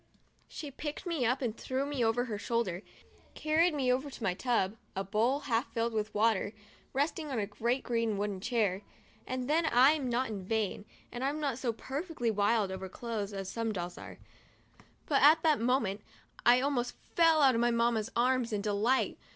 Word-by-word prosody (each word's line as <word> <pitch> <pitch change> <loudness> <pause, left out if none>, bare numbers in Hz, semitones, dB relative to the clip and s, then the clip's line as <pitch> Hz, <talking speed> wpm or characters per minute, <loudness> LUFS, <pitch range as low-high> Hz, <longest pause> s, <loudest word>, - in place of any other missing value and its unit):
She 295 -3 -7
picked 295 +4 -6
me 325 -9 0
up 255 +3 0
and 230 -3 -1
threw 265 +3 -2
me 285 -4 -1
over 230 +2 +1
her 215 -4 -4
shoulder, 215 -6 -1 0.5
carried 315 +2 +2
me 255 -3 +2
over 265 +3 -2
to 255 - -10
my 185 - +1
tub 215 -1 0
— - - -37
a 195 - -1
bowl 225 +8 +1
half 245 -1 -1
filled 230 0 -1
with 215 0 -2
water 210 -1 +1 0.2
— - - -27
resting 300 +3 -1
on 265 - -2
a 210 - 0
great 235 +5 -1
green 230 -3 0
wooden 200 -2 -2
chair, 210 -5 0 0.5
and 255 -1 -3
then 320 +3 +2
— - - -10
I'm 265 +2 +4
not 240 0 0
vain, 205 +1 -2 0.3
and 245 +1 -5
I'm 285 +3 -1
not 275 -5 -2
so 250 -3 0
perfectly 270 +1 -3
wild 205 -1 +1
over 190 0 -5
clothes 215 -1 -4
as 195 -1 -5
some 225 +3 -2
dolls 175 -3 -4
are; - - -10 0.9
but 280 - +2
at 310 +3 +6
that 310 -3 +3
moment 230 -5 +1 0.5
I 245 +1 +7
almost 255 -3 -1 0.2
fell 325 -3 +5
out 265 -2 +6
of 230 - +1
my 240 - +3
Mamma's 235 -2 +1
arms, 250 0 +2
in 210 -1 -1
my - - -10
delight. 215 +5 +1
235 Hz, 200 wpm, -31 LUFS, 215-270 Hz, 0.9 s, I